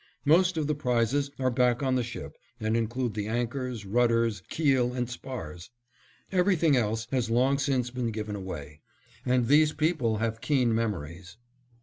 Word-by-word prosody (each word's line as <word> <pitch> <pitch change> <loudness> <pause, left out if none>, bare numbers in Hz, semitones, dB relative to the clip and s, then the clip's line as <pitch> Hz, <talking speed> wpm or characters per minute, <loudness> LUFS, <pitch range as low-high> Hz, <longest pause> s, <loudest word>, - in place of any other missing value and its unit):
Most 175 +4 +4
of 155 - 0
the 150 - 0
prizes 140 0 0
are 130 -1 +1
back 125 +1 +2
on 130 -1 +1
the 130 - +2
ship 120 0 -7 0.2
and 110 0 0
include 115 +1 -1
the 105 0 -3
anchors, 120 0 -3
rudders, 115 -1 +2
keel, 135 -6 +2
and 125 -1 -2
spars. 120 - -7 0.6
Everything 180 -5 +3
else 110 -2 0
has 125 -4 0
long 130 +4 +2
since 130 -3 0
been 125 -2 -2
given 105 -1 -4
away, 75 -6 -7 0.5
and 125 -1 +3
these 150 +3 +5
people 150 -8 0
have 110 0 -2
keen 125 -6 +2
memories. 95 -5 -3
120 Hz, 155 wpm, -28 LUFS, 110-135 Hz, 0.6 s, these